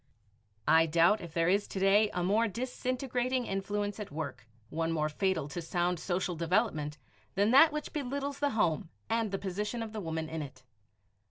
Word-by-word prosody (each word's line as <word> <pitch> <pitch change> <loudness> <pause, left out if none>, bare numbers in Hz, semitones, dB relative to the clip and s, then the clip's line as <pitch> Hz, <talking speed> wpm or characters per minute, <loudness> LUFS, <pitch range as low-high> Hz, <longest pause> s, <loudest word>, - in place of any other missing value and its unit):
I 165 0 +6
doubt 170 +6 +4
if 170 -3 -8
there 165 -1 +2
is 200 +3 +2
to 195 - -5
day 200 +2 +4
a 180 -3 -2
more 215 +5 +3
disintegrating 255 +2 -2
influence 205 +1 -2
at 210 - -6
work 140 -7 -5 0.2
one 165 0 -1
more 155 -2 0
fatal 165 -2 0
to 175 +3 -4
sound 175 +1 0
social 180 0 -1
development 165 -3 0 0.4
than 205 +3 +3
that 295 +5 +8
which 300 0 -5
belittles 280 0 -3
the 290 - +2
home 165 -5 +1 0.2
and 225 -1 +1
the 195 - -2
position 210 +5 -3
of 220 -1 -7
the 215 - -4
woman 160 -2 -3
in 160 0 -4
it. 135 -3 -9
195 Hz, 180 wpm, -31 LUFS, 165-225 Hz, 0.4 s, that